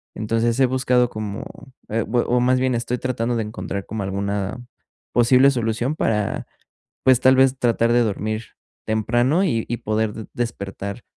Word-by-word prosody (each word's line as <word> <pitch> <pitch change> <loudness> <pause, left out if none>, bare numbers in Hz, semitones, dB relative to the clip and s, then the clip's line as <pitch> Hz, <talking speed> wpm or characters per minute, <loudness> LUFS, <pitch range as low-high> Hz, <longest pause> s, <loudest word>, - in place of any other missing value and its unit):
Entonces, 115 +3 0
he 135 - +6
buscado 125 -1 +2
como, 105 -2 -5 0.4
eh, 115 +1 0
o 125 0 +2
más 130 +1 +3
bien 130 -1 +1
estoy 120 +1 -2
tratando 120 -2 -1
de 115 - 0
encontrar 100 -2 -5
como 110 -1 -4
alguna 100 +2 -2 0.5
posible 125 +3 +5
solución 120 +2 -1
para, 105 -8 -1 0.6
pues, 130 -2 +5
tal 130 +1 +5
vez 130 0 +4
tratar 115 -1 +2
de 120 - +4
dormir 110 0 -2 0.4
temprano, 120 - +1
y 115 - 0
y 120 - -2
poder 110 0 -1
de 110 -1 -7
despertar 100 -2 -5
115 Hz, 155 wpm, -22 LUFS, 110-125 Hz, 0.6 s, he